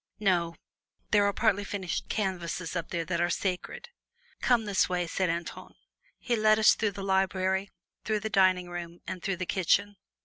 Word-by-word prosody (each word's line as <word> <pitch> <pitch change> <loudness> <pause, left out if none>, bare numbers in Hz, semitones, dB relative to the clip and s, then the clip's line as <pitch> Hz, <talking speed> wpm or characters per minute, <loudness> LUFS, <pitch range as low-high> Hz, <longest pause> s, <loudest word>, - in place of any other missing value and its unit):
No; 175 -5 +1 0.6
there 205 -1 +5
are - - +2
partly 200 +1 +1
finished 195 -3 -4
canvases 180 -4 -2
up 170 -2 -3
there 170 -2 -2
that 170 0 -1
are 175 - +2
sacred." 200 - -3 0.5
"Come 240 -3 +3
this 200 -3 +2
way," 180 -1 0
said 180 +2 -1
Antoine. 170 0 -5 0.4
He 245 - -1
led 215 -1 +4
us 220 - +6
out - - -9
through 220 -2 +1
the 200 0 -6
library, 190 0 +1 0.4
then 215 -1 0
the 220 - -2
dining 185 -3 +3
room 175 -1 -7
and 185 -1 -5
through 195 -2 -2
the 185 - -3
kitchen. 200 +3 +1
190 Hz, 180 wpm, -29 LUFS, 175-205 Hz, 0.6 s, us